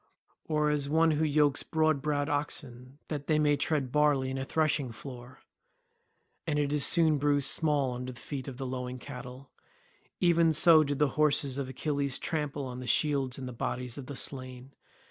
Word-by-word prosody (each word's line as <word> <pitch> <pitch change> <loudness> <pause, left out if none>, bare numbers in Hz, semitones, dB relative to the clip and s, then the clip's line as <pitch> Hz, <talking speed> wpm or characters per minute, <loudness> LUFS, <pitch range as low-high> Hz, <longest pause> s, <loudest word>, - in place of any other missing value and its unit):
Or 150 -1 +1
as 145 -1 -1
one 160 +2 +3
who 155 +1 +1
yokes 145 -2 +2
broad 155 -3 +1
browed 145 0 -1
oxen 140 -3 -4
that 145 -2 -5
they 155 - +3
may 150 -1 +3
tread 145 -4 -1
barley 145 -3 +2
in 135 - -3
a - - -2
threshing 150 -3 0
floor—and 130 +4 -11
it 145 0 0
is 150 -1 +2
soon 160 -3 +4
bruised 145 -1 +2
small 145 -5 +1
under 125 +1 -5
the 120 - -11
feet 135 +1 -6
of 130 -3 -7
the 135 - -5
lowing 125 0 -4
cattle—even 140 +6 -3
so 160 0 +6
did 145 -1 -2
the 150 0 +2
horses 140 -3 +2
of 135 -2 -3
Achilles 140 0 -1
trample 145 -3 -3
on 125 -1 -6
the 125 - -7
shields 135 0 +1
and 130 -2 -7
bodies 125 +1 -4
of 140 -3 -8
the 140 - -6
slain. 130 0 -5
140 Hz, 175 wpm, -29 LUFS, 130-150 Hz, -, so